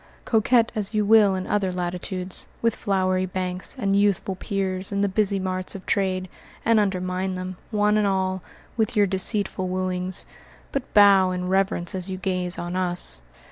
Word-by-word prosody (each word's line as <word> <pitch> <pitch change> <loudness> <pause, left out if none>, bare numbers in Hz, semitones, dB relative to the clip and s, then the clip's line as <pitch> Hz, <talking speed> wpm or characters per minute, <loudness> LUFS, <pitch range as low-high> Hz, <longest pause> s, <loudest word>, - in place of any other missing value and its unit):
Coquette 230 +1 +3
as 215 -1 -3
you 210 -1 +2
will 210 -2 +5
in 185 0 -3
other 200 -3 0
latitudes, 180 +1 -2
with 230 -1 +1
flowery 185 -2 0
banks 185 +2 -3
and 195 -5 0
youthful 200 -1 +1
piers 190 -1 -3
in 200 0 -1
the 200 - +2
busy 200 0 +1
marts 185 0 -3
of 195 - -9
trade, 185 -2 0 0.4
and 230 -1 +4
undermine 185 -1 -1
them, 185 0 -5
one 210 -1 +2
and 210 -1 +2
all, 190 -1 -1 0.4
with 220 +1 0
your 205 -1 +4
deceitful 190 0 0
wooings, 185 0 0 0.5
but 275 -2 -4
bow 200 -2 +6
in 180 0 -3
reverence 190 -2 +1
as 185 0 -3
you 185 - -4
gaze 185 -1 -1
on 175 +1 -4
us. 175 - +2
190 Hz, 170 wpm, -24 LUFS, 185-205 Hz, 0.5 s, bow